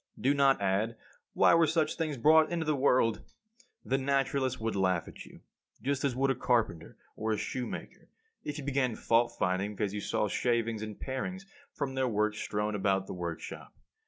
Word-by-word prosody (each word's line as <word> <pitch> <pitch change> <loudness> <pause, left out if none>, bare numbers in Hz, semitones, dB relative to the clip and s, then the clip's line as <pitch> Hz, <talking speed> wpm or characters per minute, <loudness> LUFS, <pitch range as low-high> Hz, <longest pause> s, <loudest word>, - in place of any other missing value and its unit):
Do 135 +3 +3
not 140 -3 +4
add, 100 +4 0 0.4
"Why - - +5
were 165 -1 +5
such 155 0 +1
things 155 -4 -2
brought 155 +6 +5
into 170 -2 -1
the 155 -1 +1
world?" 130 -4 +2 0.6
The 135 +1 +1
naturalist 135 -1 0
would 110 -1 -2
laugh 95 -3 +1
at - - -10
you, - - -15 0.4
just 140 +1 -1
as 135 -4 0
would 135 +1 +2
a - - 0
carpenter 110 -10 0 0.2
or 110 0 -1
a - - -1
shoemaker, 125 +3 -5 0.4
if 150 0 -4
you 145 - -5
began 135 -4 0
fault 120 +1 +2
finding 95 +3 0
because 100 -1 -2
you 105 - -3
saw 105 - 0
shavings 115 0 0
and 110 -1 -6
parings 185 +9 -4 0.3
from 140 -2 -3
their 130 -1 0
work 105 -2 +1
strewn 105 0 -2
about 95 -1 +1
the - - -6
workshop. 85 -2 -6
120 Hz, 185 wpm, -30 LUFS, 105-140 Hz, 0.6 s, Why